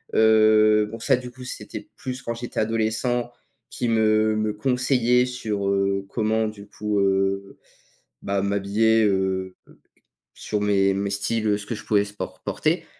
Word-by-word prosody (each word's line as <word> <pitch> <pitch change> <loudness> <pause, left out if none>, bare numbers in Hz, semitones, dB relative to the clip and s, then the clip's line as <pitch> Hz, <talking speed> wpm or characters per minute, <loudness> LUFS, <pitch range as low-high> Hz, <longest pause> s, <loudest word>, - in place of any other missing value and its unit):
heu, 110 -1 +5
bon, 115 - -7
ça, 135 +3 +3
du 125 0 -7
coup, 130 0 -12
c'était 125 - -7
plus 130 0 -6
quand 115 -2 -4
j'étais 120 +1 -5
adolescent, 115 +2 0 0.4
qui 120 - -2
me 110 -1 +3
me 110 0 -1
conseillaient 125 +1 +2
sur, 110 -6 -3
heu, 100 0 0
comment, 110 +1 0
du 105 -1 -9
coup, 105 0 -2
heu, 95 0 0 0.6
bah, 100 0 -1
m'habiller, 100 +3 +2
heu, 95 -2 -1 0.8
sur 105 -1 -3
mes 100 -1 +2
mes 100 +1 -2
styles, 110 +3 -1
heu, 105 -1 +2
ce 100 - -8
que 110 - -4
je 110 - -7
pouvais 105 -1 +2
sport 105 0 -7
por - - -28
porter. - - -1
110 Hz, 160 wpm, -23 LUFS, 100-115 Hz, 0.8 s, heu